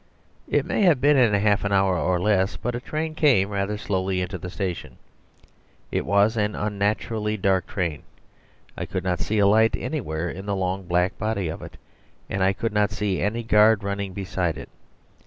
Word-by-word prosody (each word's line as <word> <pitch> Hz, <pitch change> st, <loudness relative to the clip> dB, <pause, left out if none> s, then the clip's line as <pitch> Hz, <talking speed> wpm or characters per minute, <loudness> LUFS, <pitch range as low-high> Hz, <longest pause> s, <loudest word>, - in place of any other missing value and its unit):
It -, -, +1 dB
may -, -, -1 dB
have 175 Hz, -9 st, +5 dB
been 145 Hz, +3 st, +4 dB
in 125 Hz, -5 st, +4 dB
half 100 Hz, 0 st, +2 dB
an 100 Hz, -, -1 dB
hour 95 Hz, -1 st, +3 dB
or 90 Hz, +1 st, +1 dB
less, 95 Hz, +1 st, +1 dB
but 120 Hz, +2 st, -3 dB
a 120 Hz, -, -3 dB
train 155 Hz, +5 st, -4 dB
came 130 Hz, -12 st, +3 dB
rather 100 Hz, +1 st, -2 dB
slowly 95 Hz, -2 st, -1 dB
into 90 Hz, 0 st, -4 dB
the 90 Hz, -, -6 dB
station. 90 Hz, -5 st, -5 dB, 0.9 s
It -, -, -2 dB
was 100 Hz, +3 st, +3 dB
an 105 Hz, -1 st, 0 dB
unnaturally 105 Hz, +1 st, -1 dB
dark 95 Hz, -1 st, +1 dB
train; 85 Hz, -7 st, -3 dB, 0.7 s
I -, -, -5 dB
could -, -, -3 dB
not 90 Hz, -2 st, -1 dB
see 110 Hz, -, -1 dB
a 100 Hz, -, +4 dB
light 110 Hz, +3 st, +4 dB
anywhere 90 Hz, -, -3 dB
in 95 Hz, +4 st, -7 dB
the 100 Hz, -, 0 dB
long 95 Hz, 0 st, -2 dB
black 90 Hz, +2 st, 0 dB
body 100 Hz, -5 st, -1 dB
of 80 Hz, -, -6 dB
it; -, -, -10 dB, 0.5 s
and 95 Hz, -, -1 dB
I 95 Hz, -, +4 dB
could 110 Hz, +3 st, -3 dB
not 105 Hz, -1 st, +2 dB
see 100 Hz, -2 st, -2 dB
any 115 Hz, +3 st, -1 dB
guard 110 Hz, -1 st, +4 dB
running 100 Hz, -1 st, -3 dB
beside 90 Hz, -4 st, -2 dB
it. -, -, -9 dB
100 Hz, 195 wpm, -24 LUFS, 95-110 Hz, 0.9 s, have